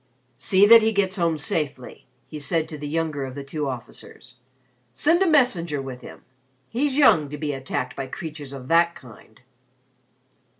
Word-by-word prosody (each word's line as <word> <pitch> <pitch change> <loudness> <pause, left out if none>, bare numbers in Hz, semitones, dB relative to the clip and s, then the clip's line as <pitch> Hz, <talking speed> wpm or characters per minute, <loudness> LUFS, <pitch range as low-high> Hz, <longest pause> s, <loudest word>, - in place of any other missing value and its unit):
"See 190 +7 +4
that 230 +2 +9
he 220 0 +1
gets 195 -1 0
home 170 -3 +1
safely," 145 -3 -4 0.2
he 155 - -9
said 160 +2 -1
to 155 - -7
the 145 - -5
younger 155 -2 -2
of 130 -1 -7
the 140 - -6
two 145 0 -4
officers. 125 0 -10 0.6
"Send 330 - +3
a 385 - +4
messenger 190 - +2
with 130 -2 -7
him. - - -12 0.5
He's 275 +3 -1
young 160 - +5
to 150 - -6
be 145 -1 -3
attacked 130 -1 -4
by 135 -1 -5
creatures 150 -2 -8
of 135 -2 -9
that 170 +1 +3
kind." 110 -3 -16
155 Hz, 170 wpm, -23 LUFS, 135-190 Hz, 0.6 s, that